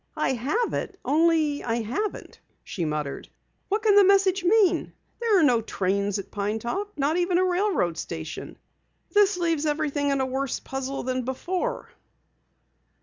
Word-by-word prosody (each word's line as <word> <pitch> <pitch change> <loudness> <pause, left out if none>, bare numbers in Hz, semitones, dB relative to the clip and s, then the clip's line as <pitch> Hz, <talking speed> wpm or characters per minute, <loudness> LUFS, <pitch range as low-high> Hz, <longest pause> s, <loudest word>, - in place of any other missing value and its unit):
"I - - +1
have 290 - -1
it, 390 - -4
only 310 0 +2
I 230 -1 -1
haven't," 335 - -4 0.2
she 175 - -4
muttered. 150 -2 -4 0.4
"What 420 +2 0
can 430 -2 +5
the 405 - +8
message 390 -1 +3
mean? 370 -3 +3 0.3
There 450 -5 +3
are - - +4
no 245 -6 +4
trains 200 -1 -1
at 200 - -7
Pine 205 +1 -2
Top 390 - -3
not 290 +4 +1
even 355 0 +2
a 370 - +3
railroad 360 - 0
station. 160 -2 -6 0.5
This 410 -2 +4
leaves 330 -3 0
everything 295 -1 0
in 275 -1 +1
a 265 - +1
worse 265 0 -2
puzzle 270 +1 -4
than 255 0 -1
before!" 360 - -3
295 Hz, 155 wpm, -25 LUFS, 240-380 Hz, 0.5 s, the